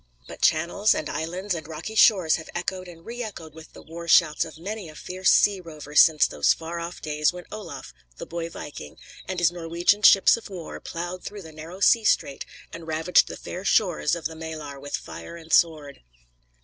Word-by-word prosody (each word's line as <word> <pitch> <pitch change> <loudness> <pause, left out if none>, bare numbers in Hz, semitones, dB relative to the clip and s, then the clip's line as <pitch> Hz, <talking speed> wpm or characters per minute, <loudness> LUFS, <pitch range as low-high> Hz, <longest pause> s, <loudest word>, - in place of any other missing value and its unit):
But - - -11
channels, 170 +6 +3
and 155 - -3
islands, 180 +7 -3
and 160 -3 -6
rocky 160 +7 -7
shores 190 -7 +5
have 160 - -10
echoed 185 +1 -3
and 165 -1 -13
re 240 +1 -6
echoed 170 -9 -7
with 160 0 -14
the - - -13
war 170 +1 -9
shouts 160 -2 +4
of 160 -1 -11
many 195 +1 -6
a 155 - -13
fierce 185 +4 -1
sea 200 -2 +4
rover 155 -3 -11
since 150 +1 +6
those - - +2
far 165 +1 -6
off 170 +1 -7
days 150 -1 +1
when 180 -1 -10
Olaf, 170 -11 -8 0.2
the - - -7
boy 170 0 -5
viking, 145 - -9 0.3
and 185 - -4
his 175 -1 +3
Norwegian 175 +4 0
ships 195 -2 +7
of 230 - -11
war 180 -4 -8
ploughed 175 +2 -6
through 205 -1 -8
the 160 - -11
narrow 160 +5 -10
sea 230 +2 +5
strait 140 -9 0 0.3
and 165 -1 -9
ravaged 160 +3 +3
the - - -7
fair 180 - -7
shores 180 -7 +2
of 170 - -8
the 165 - -2
Maelar 155 -3 -7
with 145 +1 -4
fire 170 - -9
and 165 -1 -8
sword. 150 -4 +2
170 Hz, 200 wpm, -25 LUFS, 155-185 Hz, 0.3 s, ships